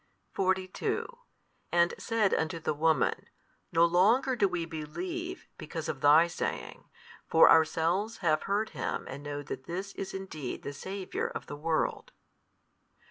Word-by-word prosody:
42 185 -1 -1 0.6
And 170 0 +3
said 225 -4 +1
unto 160 +1 0
the 155 - -1
woman, 160 +1 +1 0.4
No 165 +1 +5
longer 220 +10 +3
do 205 -4 +3
we 175 -2 -2
believe, 345 - -5
because 160 0 -5
of 135 - -4
thy 150 +3 +7
saying: 170 - -4 0.4
for 165 - +7
ourselves 165 +7 +3
have 155 -2 +3
heard 210 +2 +1
Him - - -3
and 135 +2 -7
know 145 0 -5
that 130 -1 -7
This 190 +3 -5
is 195 - -5
indeed 160 -9 -6
the 140 - -5
Saviour 190 +6 -4
of - - -6
the 145 - -7
world. 155 +2 -1
170 Hz, 140 wpm, -30 LUFS, 155-195 Hz, 0.6 s, thy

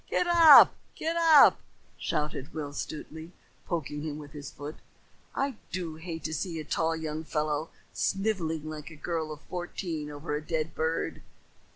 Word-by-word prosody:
"Get - - +1
up! 335 -4 +9 0.2
Get 325 +1 -2
up!" 325 -4 +7 0.4
shouted 150 0 -3
Will 145 -2 -4
Stutely, 160 +3 -7 0.3
poking 150 -4 -3
him 150 -1 -4
with 145 -2 -10
his 145 -2 -8
foot. 145 +2 -8 0.6
"I 275 -4 -1
do 170 -4 -4
hate 160 0 -6
to 160 - -3
see 165 +2 -3
a - - -4
tall 165 +2 0
young 160 -1 -4
fellow 155 0 -1 0.2
snivelling 175 -7 -1
like 155 0 -7
a 160 - -11
girl 160 0 -3
of 150 0 -8
fourteen 175 -3 -5
over 150 +1 -4
a 150 - -2
dead 160 0 -2
bird." 160 +1 -2
160 Hz, 160 wpm, -29 LUFS, 150-175 Hz, 0.6 s, up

